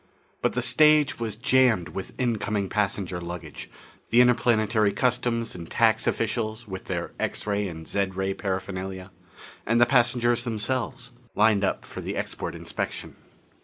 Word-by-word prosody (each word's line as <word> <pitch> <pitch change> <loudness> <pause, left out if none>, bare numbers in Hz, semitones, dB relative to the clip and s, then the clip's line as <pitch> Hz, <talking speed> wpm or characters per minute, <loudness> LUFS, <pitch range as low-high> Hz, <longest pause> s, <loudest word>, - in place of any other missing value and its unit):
But - - +1
the - - -1
stage 150 -3 +4
was 110 -3 -3
jammed 120 -6 +3
with 95 - -7
incoming 105 -5 -1
passenger 95 -4 -1
luggage, 85 -3 -7 0.4
the 120 - +4
interplanetary 115 -4 +3
customs 120 -2 0
and 85 -2 -8
tax 115 -1 +2
officials 110 0 -1
with 95 -1 -7
their - - -3
x - - -2
ray 105 -1 0
and 80 -2 -8
zed 100 -2 -1
ray 95 0 -1
paraphernalia 95 -1 -4 0.5
and 115 +2 +2
the 120 - +7
passengers 120 -1 +2
themselves, 120 +2 -2 0.2
lined 105 -1 +4
up 95 - -1
for - - -8
the - - -4
export - - -4
inspection. - - -5
110 Hz, 145 wpm, -26 LUFS, 95-120 Hz, 0.5 s, the